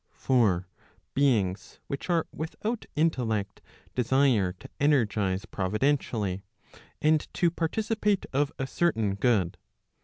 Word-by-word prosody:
For 105 -9 +2 0.5
beings 105 -9 +1
which 140 +6 -5
are 170 -2 +2
without 210 +8 -4
intellect 115 -11 0 0.3
desire 125 -6 +3
to 135 - -13
energize 105 -9 +2
providentially, 105 -1 0 0.6
and 155 0 +2
to 170 -1 +3
participate 210 +4 0
of 145 +2 +1
a 135 - -2
certain 115 - +1
good. 100 -4 +1
130 Hz, 100 wpm, -28 LUFS, 100-155 Hz, 0.6 s, desire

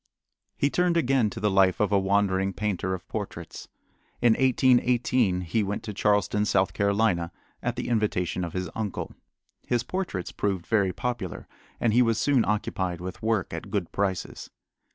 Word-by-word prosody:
He 140 - +1
turned 180 -1 +2
again 135 -7 +2
to - - -7
the 105 -1 +1
life 95 -1 +4
of 105 -1 +1
a 100 - +4
wandering 95 0 +1
painter 95 -3 -1
of 90 - -11
portraits. - - -6 0.5
In 120 -2 +5
1818 125 -5 +3
he 90 +6 0
went 100 0 -3
to 105 - -5
Charleston, 105 0 +2
South 95 -2 +2
Carolina, 100 -4 +1 0.3
at - - -2
the - - -4
invitation 105 -6 0
of 85 - -5
his 95 0 -2
uncle. 110 -3 -4 0.5
His 120 -1 +1
portraits 175 - -3
proved 95 -4 -2
very 100 -4 +2
popular 115 -4 -4 0.3
and 115 -2 +2
he 125 - +5
was 115 -2 +2
soon 135 -3 +3
occupied 95 -4 -1
with 90 0 -7
work 110 -4 0
at - - -6
good - - -2
prices. 95 -2 -2
105 Hz, 165 wpm, -26 LUFS, 95-120 Hz, 0.5 s, In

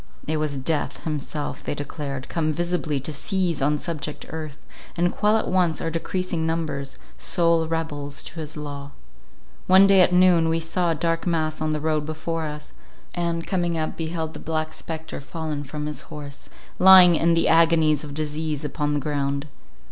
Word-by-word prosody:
It 155 +1 -1
was 150 -2 -1
Death 150 +3 -2
himself, 150 -1 -4
they - - -3
declared, 140 -2 -5
come 155 -2 0
visibly 170 -2 -1
to 155 +4 -5
seize 175 0 -1
on 150 +2 +2
subject 150 -2 -5
earth, 155 -2 -6 0.4
and 175 +1 +1
quell 210 +1 +3
at - - -2
once 180 -3 +2
our 165 - -2
decreasing 170 0 -2
numbers, 155 -4 -2 0.2
sole 170 -2 +2
rebels 150 -3 -3
to 165 - -8
his 155 0 -5
law. 145 -1 -7 0.7
One 190 +1 +7
day 195 -1 +6
at 180 - +5
noon, 180 -2 +5
we 165 0 +1
saw 170 +2 -1
a 165 - +1
dark 165 +2 -1
mass 155 -2 0
on 155 - 0
the 155 - -1
road 155 0 0
before 160 +1 -3
us, 150 0 -8 0.4
and, 170 -1 -2
coming 175 -3 0
up, 155 0 -2
beheld 160 -1 -3
the - - -8
Black 155 0 -2
Spectre 160 -2 -6
fallen 155 -1 -4
from 150 +2 -5
his 150 -3 -3
horse, 145 -1 -10 0.3
lying 185 -2 +9
in 165 +1 +3
the 165 - +2
agonies 160 -3 +4
of 145 -1 -7
disease 155 -1 -3
upon 145 0 -1
the - - +1
ground. 140 -1 -2
160 Hz, 180 wpm, -24 LUFS, 150-170 Hz, 0.7 s, lying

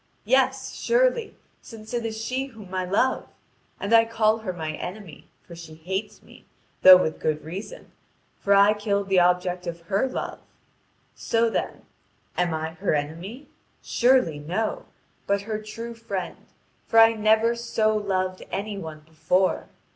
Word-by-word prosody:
Yes, 265 +2 +1
surely, 485 -2 +1 0.3
since 220 0 -11
it 240 -1 -1
is 220 0 -5
she 255 +4 -2
whom 215 -7 -13
I 185 -1 -1
love. 205 +8 +1 0.5
And 200 +3 -2
I 225 0 +8
call 225 -1 +1
her 215 -4 -4
my 160 -3 -4
enemy, 180 -2 -8 0.2
for 170 - -12
she 165 -2 -11
hates 190 +6 -5
me, - - -18 0.3
though 185 0 +11
with 160 -3 -2
good 155 -1 -1
reason, 195 - -8 0.5
for 200 0 +3
I 200 +1 +6
killed 200 -1 -2
the 190 -1 +4
object 180 0 +1
of 170 0 -5
her 195 +9 0
love. - - -5 0.7
So, 230 0 0
then, - - -3 0.5
am 180 -1 +1
I 160 0 -3
her 180 -1 -1
enemy? 170 - -5 0.4
Surely 240 - +2
no, 180 +9 -3 0.4
but 200 0 +1
her 215 +1 -4
true 230 +2 -7
friend, 205 -5 -6 0.4
for 225 - 0
I 225 0 +8
never 220 +1 +3
so 225 -2 0
loved 185 -3 -1
any 200 0 -4
one 160 -3 -8
before. 160 +4 0
200 Hz, 155 wpm, -25 LUFS, 180-225 Hz, 0.7 s, though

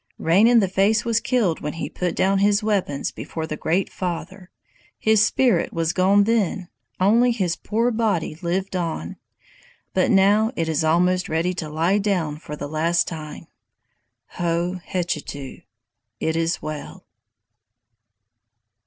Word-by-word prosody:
Rain 185 +7 +4
in 240 -1 +5
the 195 - +1
Face 195 +5 +2
was 230 -1 +2
killed 230 -8 0
when 150 - -4
he 165 - -4
put 180 -2 -3
down 195 +1 +2
his 205 +1 +3
weapons 195 -10 -1
before 160 -1 -6
the 155 - -4
Great 175 +5 0
Father. 180 +1 -5 0.5
His 220 -1 +3
spirit 245 +2 +2
was 165 0 -1
gone 195 +2 +4
then; 200 -4 0 0.3
only 225 +6 +4
his 190 -7 -1
poor 230 +3 0
body 215 -9 0
lived 185 +2 -2
on, 165 - -3 0.8
but 185 - +2
now 205 +3 +4
it 165 - -1
is 160 0 0
almost 180 +3 +2
ready 165 +3 0
to 165 -4 -5
lie 165 +6 +1
down 180 -7 -1
for 150 -1 -8
the 145 - -6
last 165 +3 +1
time. 155 -2 -7 0.9
Ho, 175 +1 -1
hechetu! 150 -7 -4 0.6
[It 160 - -1
is 165 +1 -1
well. 155 +4 -7
180 Hz, 145 wpm, -22 LUFS, 165-205 Hz, 0.9 s, in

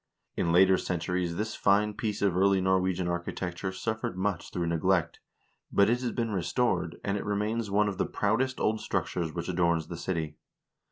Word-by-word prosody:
In 85 - 0
later 95 +2 +5
centuries 90 0 -2
this 110 +4 -2
fine 105 +1 +2
piece 105 -1 -3
of 100 -3 +2
early 95 +1 +4
Norwegian 95 -1 +1
architecture 90 +1 -3
suffered 110 -1 -3
much 95 -2 -2
through 85 -1 -2
neglect, 85 +1 +1 0.5
but 100 +2 +4
it 120 +1 +1
has 125 -2 -1
been 115 -2 -2
restored, 90 -2 0
and 100 0 0
it - - -4
remains 105 +2 -1
one 105 +1 +3
of 100 -1 -4
the - - +1
proudest 130 +6 0
old 110 0 +1
structures 85 -3 -2
which 85 +1 -5
adorns 85 -3 +1
the 85 - -5
city. 80 -3 -3
95 Hz, 175 wpm, -29 LUFS, 85-105 Hz, 0.5 s, later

